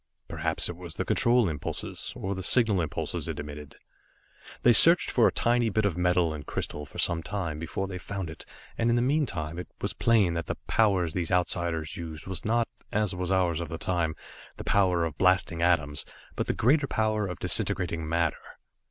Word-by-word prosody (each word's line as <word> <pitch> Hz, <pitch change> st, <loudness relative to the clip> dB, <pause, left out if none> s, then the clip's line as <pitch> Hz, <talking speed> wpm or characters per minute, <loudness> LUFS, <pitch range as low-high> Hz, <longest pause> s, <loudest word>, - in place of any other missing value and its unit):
Perhaps -, -, -1 dB
it 85 Hz, -, -5 dB
was 85 Hz, -2 st, -7 dB
the -, -, -2 dB
control 120 Hz, -2 st, +3 dB
impulses, 75 Hz, -4 st, -3 dB
or 95 Hz, +1 st, -3 dB
the 95 Hz, -, -5 dB
signal 105 Hz, -2 st, +3 dB
impulses 80 Hz, -, -3 dB
it -, -, -4 dB
emitted. 75 Hz, 0 st, -8 dB, 0.9 s
They 120 Hz, -, +7 dB
searched 170 Hz, +9 st, +6 dB
for 120 Hz, -, +5 dB
the -, -, +2 dB
tiny 120 Hz, -1 st, +2 dB
bit 110 Hz, 0 st, +1 dB
of 100 Hz, -5 st, +1 dB
metal 90 Hz, -2 st, +2 dB
and 75 Hz, -2 st, -6 dB
crystal 75 Hz, 0 st, -4 dB
for -, -, -13 dB
some 85 Hz, -1 st, +1 dB
time 85 Hz, -4 st, -4 dB
before 80 Hz, +4 st, -3 dB
they 90 Hz, -1 st, -6 dB
found 95 Hz, -1 st, -5 dB
it. 80 Hz, -, -10 dB, 0.4 s
And 115 Hz, -, +2 dB
in 120 Hz, -, +3 dB
the 120 Hz, -, +2 dB
meantime 95 Hz, -, -1 dB
it 90 Hz, -, -6 dB
was -, -, -3 dB
plain 110 Hz, -7 st, +3 dB
that 85 Hz, -1 st, -3 dB
the -, -, -2 dB
power 100 Hz, -6 st, +2 dB
these 85 Hz, +1 st, -3 dB
Outsiders 85 Hz, -3 st, -1 dB
used 80 Hz, -2 st, -7 dB
was 95 Hz, -1 st, -4 dB
not, 115 Hz, +1 st, +1 dB, 0.2 s
as 105 Hz, -2 st, 0 dB
was 90 Hz, -1 st, -3 dB
ours 90 Hz, -4 st, +2 dB
of 85 Hz, -2 st, -4 dB
the 80 Hz, -, -4 dB
time, 85 Hz, -3 st, -1 dB, 0.4 s
the -, -, -6 dB
power 90 Hz, -4 st, +2 dB
of 80 Hz, -3 st, -6 dB
blasting 90 Hz, -3 st, +3 dB
atoms, 75 Hz, -5 st, +1 dB, 0.3 s
but -, -, -2 dB
the -, -, +1 dB
greater 140 Hz, +4 st, +3 dB
power 110 Hz, -3 st, 0 dB
of 90 Hz, -2 st, -5 dB
disintegrating 80 Hz, -3 st, 0 dB
matter. 85 Hz, -1 st, -2 dB
90 Hz, 195 wpm, -28 LUFS, 80-105 Hz, 0.9 s, They